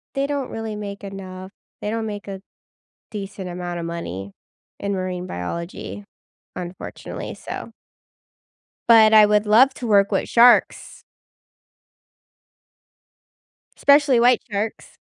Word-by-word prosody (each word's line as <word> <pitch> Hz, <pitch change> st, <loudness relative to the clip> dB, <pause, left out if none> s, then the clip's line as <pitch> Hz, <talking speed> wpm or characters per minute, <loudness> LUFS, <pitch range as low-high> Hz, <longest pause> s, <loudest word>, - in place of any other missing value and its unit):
they 275 Hz, 0 st, 0 dB
don't 280 Hz, -3 st, -3 dB
really 225 Hz, -1 st, -5 dB
make 205 Hz, -1 st, -7 dB
enough, 190 Hz, -1 st, -8 dB, 0.3 s
they 210 Hz, -, -3 dB
don't 225 Hz, 0 st, -2 dB
make 205 Hz, -2 st, -6 dB
a 195 Hz, -1 st, -7 dB, 0.7 s
decent 195 Hz, -3 st, -6 dB
amount 175 Hz, 0 st, -5 dB
of 170 Hz, -, -5 dB
money 100 Hz, -, -6 dB, 0.5 s
in 200 Hz, 0 st, -2 dB
marine 185 Hz, -1 st, -4 dB
biology, 170 Hz, -, -6 dB, 0.5 s
unfortunately, 180 Hz, 0 st, -7 dB
so -, -, -8 dB, 1.2 s
But 220 Hz, -2 st, +7 dB
I 215 Hz, -1 st, +8 dB
would 210 Hz, 0 st, +2 dB
love 250 Hz, +6 st, +5 dB
to 245 Hz, -, -6 dB
work 200 Hz, -2 st, +4 dB
with -, -, -1 dB
sharks 240 Hz, +1 st, +3 dB, 2.7 s
especially 280 Hz, -3 st, +4 dB
white 245 Hz, 0 st, +4 dB
sharks. 210 Hz, +1 st, -4 dB
205 Hz, 115 wpm, -22 LUFS, 185-225 Hz, 2.7 s, I